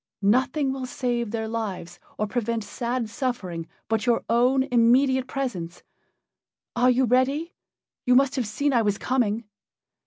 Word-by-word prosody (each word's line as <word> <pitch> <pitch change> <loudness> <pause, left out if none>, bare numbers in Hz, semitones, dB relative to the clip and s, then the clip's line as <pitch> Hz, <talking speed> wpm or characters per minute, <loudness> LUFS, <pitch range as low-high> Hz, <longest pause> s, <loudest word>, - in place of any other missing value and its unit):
Nothing 260 +6 +2
will 260 -1 -5
save 240 -2 -2
their 220 0 -3
lives 195 -6 -5 0.2
or 215 - 0
prevent 230 0 -2
sad 235 +3 -3
suffering 215 - -3 0.2
but 220 -1 -1
your 235 -1 +2
own 250 +3 +3
immediate 260 +1 +3
presence. 185 -13 -4 0.9
Are 245 +1 +4
you 255 +1 +3
ready? 265 +7 +1 0.5
You 250 - +5
must 275 +1 +4
have 250 -5 -1
seen 280 +7 0
I 235 - +4
was 205 -2 0
coming." 235 -3 0
240 Hz, 145 wpm, -25 LUFS, 220-260 Hz, 0.9 s, You